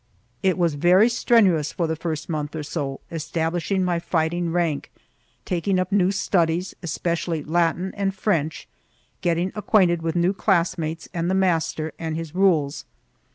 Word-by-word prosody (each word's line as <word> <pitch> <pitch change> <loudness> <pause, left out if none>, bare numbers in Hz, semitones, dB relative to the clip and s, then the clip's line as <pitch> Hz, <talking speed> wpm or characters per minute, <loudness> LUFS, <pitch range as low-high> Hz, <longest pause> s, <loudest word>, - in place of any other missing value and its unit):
It 190 -2 +2
was 170 -3 +2
very 180 +9 +5
strenuous 200 - +3
for 170 - -1
the 160 0 -1
first 160 -1 -4
month 155 -2 -3
or 155 - -3
so, 145 -3 -4
establishing 165 +3 -1
my 175 -2 0
fighting 170 0 -1
rank, 165 -4 -1 0.5
taking 185 +2 0
up 185 +1 -1
new 190 -2 +3
studies, 180 -2 0
especially 170 -1 -2
Latin 170 +3 0
and 200 -1 0
French, 170 -6 -1 0.5
getting 175 +1 0
acquainted 185 -5 +2
with 165 0 -2
new 175 +2 +2
classmates 170 -5 0
and 170 0 -1
the 190 - +1
master 165 -4 0
and 160 -1 -3
his 165 -2 -5
rules. 170 -7 +2
170 Hz, 150 wpm, -23 LUFS, 160-185 Hz, 0.5 s, very